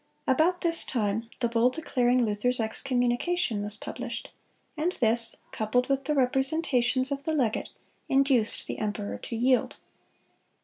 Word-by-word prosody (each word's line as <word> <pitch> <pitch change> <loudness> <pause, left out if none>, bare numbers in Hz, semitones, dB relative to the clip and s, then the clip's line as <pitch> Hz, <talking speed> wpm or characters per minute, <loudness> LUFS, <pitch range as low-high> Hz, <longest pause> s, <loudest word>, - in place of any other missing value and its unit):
About 320 +7 +2
this 335 -1 +2
time 225 -1 -2
the 240 - +3
bull 235 +1 +3
declaring 250 -4 +1
Luther's 225 +4 0
excommunication 245 - 0
was 205 +1 -3
published; 235 +2 -6 0.5
and 325 +4 -1
this, 230 -3 +1 0.2
coupled 245 +4 0
with 275 0 0
the 300 - 0
representations 265 -1 +2
of 280 0 -2
the 315 +2 -2
legate, 240 -7 0 0.4
induced 270 -5 +2
the - - -5
emperor 210 -1 -3
to 235 - -6
yield. 250 +2 +2
250 Hz, 135 wpm, -27 LUFS, 230-275 Hz, 0.5 s, the